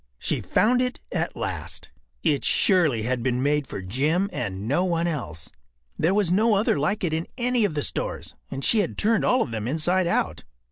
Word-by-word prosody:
She - - -2
found 245 +3 +2
it 250 0 -2
at - - -2
last. - - -5 0.3
It 150 -5 +1
surely 155 - +3
had 125 +1 -1
been 125 +1 0
made 145 -1 +1
for 95 - -6
Jim 155 - 0
and 100 -3 -4
no 145 +8 +2
one 170 -2 0
else. 140 - -4 0.4
There 165 +5 +1
was 200 -5 +2
no 215 +4 +3
other 200 -7 +2
like 195 +8 0
it 165 -3 0
in 160 +1 -2
any 245 -2 +2
of 170 -7 -2
the 145 - -1
stores, - - -2 0.2
and 135 0 -3
she 225 - +4
had 195 - -1
turned 220 0 +3
all 250 -1 +3
of 120 - -7
them 110 -1 -3
inside 175 +6 +1
out. 175 - -1
165 Hz, 200 wpm, -25 LUFS, 130-200 Hz, 0.4 s, she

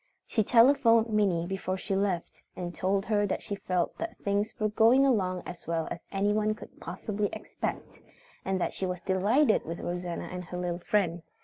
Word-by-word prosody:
She 220 - +1
telephoned 230 -1 +5
Minnie 195 -6 +2
before 190 0 -3
she 195 - -2
left 190 -3 -1
and 175 -1 -5
told 195 +3 0
her 205 -1 +2
that - - -2
she 210 - -4
felt 185 -3 -1
that 335 0 -4
things 205 +2 0
were 215 0 +1
going 230 +6 +5
along 185 -8 +1
as 175 -1 -9
well 165 -1 -1
as - - -4
anyone 210 +2 +1
could - - -13
possibly 210 -1 -3
expect, - - -5 0.4
and 190 0 -1
that - - -1
she 190 - -2
was 180 -1 -4
delighted 210 +9 +3
with 165 +2 -5
Rosanna 175 0 -4
and 180 0 -5
her 180 - -6
little 175 -1 -2
friend. 175 -3 0
195 Hz, 185 wpm, -29 LUFS, 180-215 Hz, 0.4 s, telephoned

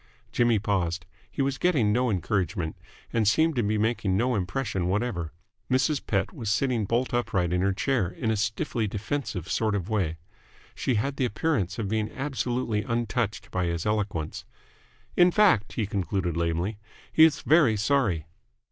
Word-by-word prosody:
Jimmy 120 -2 +3
paused. 90 -5 -1 0.2
He 140 - -1
was 135 0 -1
getting 135 -13 +2
no 125 +2 +2
encouragement, 90 -4 -1 0.4
and 110 -3 +2
seemed 160 +8 +3
to 120 - +2
be 105 0 0
making 105 -3 +1
no 125 +4 +1
impression 95 -2 -1
whatever. 95 -5 -1 0.4
Mrs. 135 +3 +1
Pett 100 -2 -1
was 110 -3 -4
sitting 120 -1 +1
bolt 120 +5 0
upright 95 -8 0
in 90 - +1
her 100 +1 +2
chair 110 +1 0
in 115 - -2
a - - +1
stiffly 110 +2 -1
defensive 105 - -3
sort 110 -1 0
of 95 0 -3
way. 95 -7 0 0.6
She 130 - -1
had 135 +6 -1
the 130 - +1
appearance 110 - -1
of 110 - -2
being 110 +1 -1
absolutely 125 -5 -1
untouched 115 -2 -2
by 90 -1 0
his 85 0 -2
eloquence. 100 -7 -2 0.7
"In 175 0 +6
fact," 180 - +3
he 110 - -1
concluded 95 -4 -2
lamely, 85 +5 -1 0.3
"he 160 - +7
is 160 -2 +5
very 150 -9 +4
sorry." 105 - +1
110 Hz, 165 wpm, -27 LUFS, 95-125 Hz, 0.7 s, he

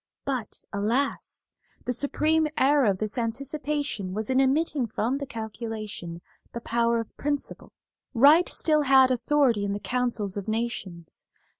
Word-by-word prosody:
But, 255 -6 -4
alas! 230 +8 -2 0.3
the 250 - 0
supreme 305 +5 +1
error 280 0 +4
of 200 -3 +2
this 215 +4 -2
anticipation 275 -4 -3
was 215 +3 -2
in 260 +1 +3
omitting 275 -1 +1
from 235 +5 -1
the 280 - -5
calculation 220 -7 -6 0.3
the 235 - -4
power 235 0 +1
of 230 - -7
principle. 290 -1 -4 0.4
Right 295 +8 +6
still 305 -2 +3
had 265 -2 +5
authority 250 -3 +2
in 200 0 -1
the 205 - -3
councils 235 -5 -2
of 200 - -5
nations. 215 -7 -5
240 Hz, 140 wpm, -26 LUFS, 215-280 Hz, 0.4 s, Right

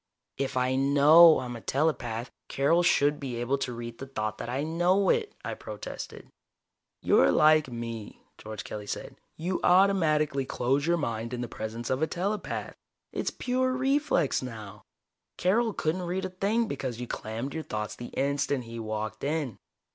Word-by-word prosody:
"If 135 -1 -1
I 125 +1 +2
know 145 +4 +7
I'm 125 -1 -5
a 115 - -8
telepath, 125 -5 -1 0.2
Carol 155 +6 +2
should 145 -4 +3
be 130 -4 -4
able 120 +4 -1
to 125 - -2
read 120 -1 -7
the 135 - -6
thought 110 -5 -3
that - - -5
I 135 +4 -1
know 175 +5 +2
it," 450 -3 +1
I - - -2
protested. - - -8 0.8
"You're - - +5
like 155 -1 +5
me," 115 -2 -6 0.2
George 110 -1 -7
Kelly 105 -1 -7
said. - - -5 0.2
"You 180 +3 -2
automatically 160 -7 +3
close 135 +3 0
your 170 0 +3
mind 115 -5 -3
in 120 - -4
the 120 - -3
presence 110 +2 -5
of 130 +2 0
a 160 - +2
telepath. 195 +5 -3 0.4
It's - - -1
pure 255 +1 0
reflex 265 - +1
now. 110 -6 -8 0.6
Carol 220 +6 +2
couldn't 165 -1 -1
read 180 +2 -2
a - - -3
thing 205 +5 0
because 130 - -4
you 125 - -3
clammed 115 +4 -5
your 160 - -3
thoughts 105 -7 -4
the 120 - -7
instant 140 -1 -1
he 115 0 -8
walked 110 0 -4
in." 145 -6 -1
140 Hz, 170 wpm, -28 LUFS, 120-170 Hz, 0.8 s, know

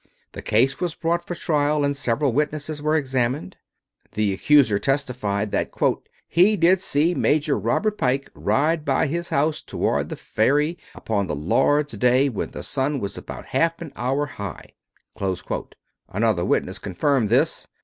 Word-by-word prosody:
The - - -8
case 130 +6 +2
was 175 -3 -2
brought 170 +1 -1
for 175 - -4
trial, 150 -2 +1
and 140 0 0
several 140 0 0
witnesses 150 +1 -2
were 155 +1 +1
examined. 130 - -1 0.6
The 105 -1 +1
accuser 125 -1 +4
testified 120 -7 -1
that - - 0 0.6
"he 195 +6 +4
did 175 +3 +4
see 160 0 +2
Major 150 -3 +1
Robert 205 - 0
Pike 135 +2 0
ride 155 +2 +1
by 140 -1 +1
his 170 +3 -3
house 150 +2 +1
toward - - -1
the - - -4
ferry 150 +9 +1 0.2
upon 100 -3 -2
the 75 - -2
Lord's 145 - +1
day 125 +5 +3
when 110 - -4
the - - -8
sun 140 +1 -1
was 100 -3 -4
about - - -8
half 165 0 +1
an 165 -4 -8
hour 135 +4 0
high." 100 - -8 1.4
Another 105 -3 +1
witness 95 -1 0
confirmed 110 +4 0
this. - - +1
140 Hz, 150 wpm, -23 LUFS, 115-155 Hz, 1.4 s, accuser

